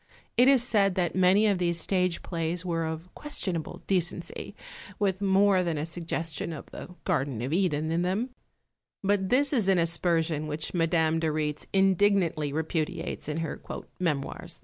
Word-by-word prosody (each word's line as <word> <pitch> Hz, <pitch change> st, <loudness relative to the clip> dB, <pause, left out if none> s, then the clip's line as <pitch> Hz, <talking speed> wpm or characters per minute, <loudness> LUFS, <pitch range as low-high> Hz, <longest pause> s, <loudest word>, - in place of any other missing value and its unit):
It 245 Hz, +2 st, +5 dB
is 270 Hz, -3 st, +6 dB
said 200 Hz, -6 st, +2 dB
that 175 Hz, -2 st, 0 dB
many 190 Hz, +3 st, +5 dB
of 200 Hz, -4 st, +2 dB
these 170 Hz, -1 st, +1 dB
stage 180 Hz, 0 st, 0 dB
plays 170 Hz, 0 st, -2 dB
were 165 Hz, -2 st, -1 dB
of 160 Hz, +3 st, -6 dB
questionable 185 Hz, -, -4 dB
decency, 180 Hz, -2 st, -2 dB, 0.4 s
with 195 Hz, -2 st, 0 dB
more 195 Hz, -1 st, +4 dB
than 170 Hz, -3 st, -1 dB
a 150 Hz, -, -2 dB
suggestion 165 Hz, -1 st, -3 dB
of 150 Hz, -, -8 dB
the 180 Hz, -, -9 dB
garden 140 Hz, -, 0 dB
of 135 Hz, +5 st, -2 dB
Eden 160 Hz, -4 st, +1 dB
in 165 Hz, +1 st, +1 dB
them; 200 Hz, +8 st, -1 dB, 0.7 s
but 195 Hz, -1 st, +1 dB
this 280 Hz, +3 st, +3 dB
is 220 Hz, -8 st, +2 dB
an 190 Hz, -, +4 dB
aspersion 165 Hz, -2 st, +1 dB
which 150 Hz, +1 st, -3 dB
Madame 165 Hz, -2 st, +2 dB
de 160 Hz, -, 0 dB
Rietz 150 Hz, -1 st, -2 dB
indignantly 190 Hz, -5 st, +3 dB
repudiates 160 Hz, 0 st, -2 dB
in 150 Hz, -, -2 dB
her -, -, -6 dB, 0.4 s
"Memoirs." 150 Hz, -6 st, -3 dB
175 Hz, 160 wpm, -28 LUFS, 160-195 Hz, 0.7 s, is